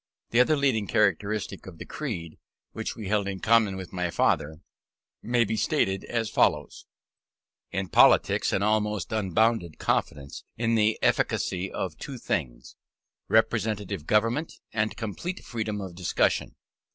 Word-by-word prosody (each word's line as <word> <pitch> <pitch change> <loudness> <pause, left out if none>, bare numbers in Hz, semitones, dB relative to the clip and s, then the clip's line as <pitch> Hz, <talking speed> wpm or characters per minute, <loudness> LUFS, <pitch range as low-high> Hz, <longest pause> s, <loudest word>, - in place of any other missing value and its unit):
The 115 - +3
other 150 +5 +4
leading 125 -7 +1
characteristics 100 0 0
of 85 - -14
the - - -8
creed, 90 - -5 0.3
which - - -4
we 110 -3 -7
held 100 0 +1
in 95 -1 -4
common 110 -3 +3
with 95 -1 -8
my 90 -1 -1
father, 80 -1 0 0.6
may 120 +1 +2
be 110 0 -2
stated 95 -2 0
as 115 -2 -1
follows: - - 0 0.8
In 95 0 -3
politics, - - +4
an 100 - +1
almost 105 -2 0
unbounded 110 -3 +1
confidence 70 -1 -2
in 115 0 +1
the 110 -1 +3
efficacy 95 +1 0
of 90 -5 -4
two 135 -2 -6
things: 60 - -4 0.5
representative 105 -6 0
government, 115 +9 +1 0.2
and 110 -1 -1
complete 145 - -5
freedom 110 -3 -3
of 95 -3 -6
discussion. 90 0 0
105 Hz, 140 wpm, -27 LUFS, 95-115 Hz, 0.8 s, other